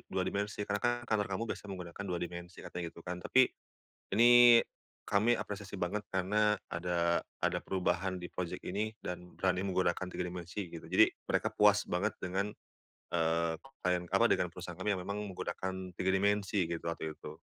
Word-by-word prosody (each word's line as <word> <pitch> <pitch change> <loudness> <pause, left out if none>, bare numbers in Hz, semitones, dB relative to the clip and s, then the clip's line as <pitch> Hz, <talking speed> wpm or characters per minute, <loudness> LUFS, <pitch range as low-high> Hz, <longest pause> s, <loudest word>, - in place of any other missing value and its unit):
dua - - 0
dimensi 105 +1 -2
karena 100 0 -1
kan 120 - +3
kantor 110 -3 +1
kamu 95 +3 -2
biasa 105 - -10
menggunakan 90 0 -6
2 90 - -1
dimensi," 85 +1 -8
katanya 90 - -5
gitu 85 0 -14
kan. 90 0 -4
"Tapi, 130 +7 +4 0.7
ini 120 0 +9 0.5
kami 105 +3 +3
apresiasi 100 -1 -6
banget 100 +4 -1
karena 105 +3 +2
ada 85 0 0 0.2
ada - - +1
perubahan 95 0 0
di 90 - -6
project 90 0 -4
ini 105 +4 -1
dan 90 0 -6
berani 95 0 +1
menggunakan 95 -1 +1
3 90 - -3
dimensi," 90 +2 -5
gitu. 85 -1 -9
Jadi - - +7 0.2
mereka - - 0
puas - - +5
banget - - 0
dengan, 95 +3 -1 0.7
eee, 80 0 +1 0.2
klien, 90 -1 +1
apa, - - +5
dengan - - +1
perusahaan - - -7
kami 105 - 0
yang 95 - -2
memang 100 +3 -3
menggunakan 95 +1 -4
3 95 - +1
dimensi 100 -2 +2
gitu 85 -1 -4
waktu 80 -2 -3
itu. - - -10
95 Hz, 170 wpm, -33 LUFS, 90-105 Hz, 0.7 s, ini